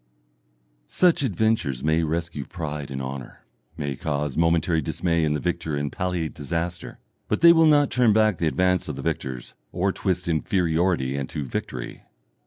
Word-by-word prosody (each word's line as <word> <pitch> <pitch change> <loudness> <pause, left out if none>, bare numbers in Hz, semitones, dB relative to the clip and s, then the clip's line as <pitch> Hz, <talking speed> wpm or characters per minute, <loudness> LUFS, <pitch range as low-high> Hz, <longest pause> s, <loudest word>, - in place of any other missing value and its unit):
Such 175 - +3
adventures 110 - 0
may 80 +2 +2
rescue 80 -2 -2
pride 75 -5 -5
and 65 -1 -4
honour, 65 -1 -8 0.3
may 70 -2 -3
cause 75 -1 -2
momentary 85 0 +2
dismay 85 +3 0
in 75 -1 +1
the 75 - -1
victor 85 -3 -2
and 70 0 -2
palliate 90 -4 -2
disaster, 85 +3 -4 0.3
but - - -1
they 170 0 +9
will 165 -1 +5
not 145 -2 +4
turn 125 -3 +4
back 110 -2 +3
the 85 - +1
advance 90 +2 +1
of - - -4
the - - -7
victors, 65 -2 -4 0.2
or 95 +2 0
twist 95 -2 -2
inferiority 85 -3 +1
into 70 +1 -4
victory. - - -5
85 Hz, 160 wpm, -24 LUFS, 75-90 Hz, 0.3 s, they